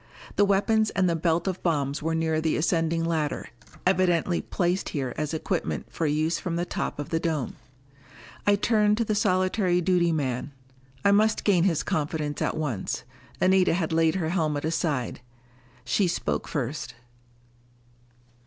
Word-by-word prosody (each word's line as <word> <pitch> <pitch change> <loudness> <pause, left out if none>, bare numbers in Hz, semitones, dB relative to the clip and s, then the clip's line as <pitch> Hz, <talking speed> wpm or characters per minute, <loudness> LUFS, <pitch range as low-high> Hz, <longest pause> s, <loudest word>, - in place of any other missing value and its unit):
The 205 - +4
weapons 215 +2 +2
and 190 -1 +1
the 170 - +1
belt 165 +2 0
of 185 -1 -2
bombs 145 -4 0
were 160 +1 -1
near 160 -1 0
the 160 0 +1
ascending 165 0 +1
ladder, 160 -3 -1 0.4
evidently 180 -2 +2
placed 180 +1 -1
here 130 -4 -3
as 150 -1 -2
equipment 165 +2 -3
for 165 - 0
use 155 +3 +1
from 170 -2 -3
the 175 +1 -1
top - - -3
of 145 - -5
the 165 - 0
dome. 160 -6 -2 0.9
I 205 - +6
turned 210 0 +2
to 230 - +1
the 215 - 0
solitary 185 -1 +2
duty 175 -1 +2
man. 135 -3 -2 0.5
I 200 - +6
must 215 +2 +3
gain 185 -4 +3
his 170 -6 +1
confidence 150 -1 -2
at - - 0
once. 135 -11 -2 0.4
Anita 185 -2 +4
had 165 -3 -1
laid 160 0 +3
her 165 -4 -1
helmet 155 -4 0
aside. 150 -7 -1 0.6
She 180 - +2
spoke 170 - -2
first. 135 -2 -3
165 Hz, 155 wpm, -26 LUFS, 155-185 Hz, 0.9 s, I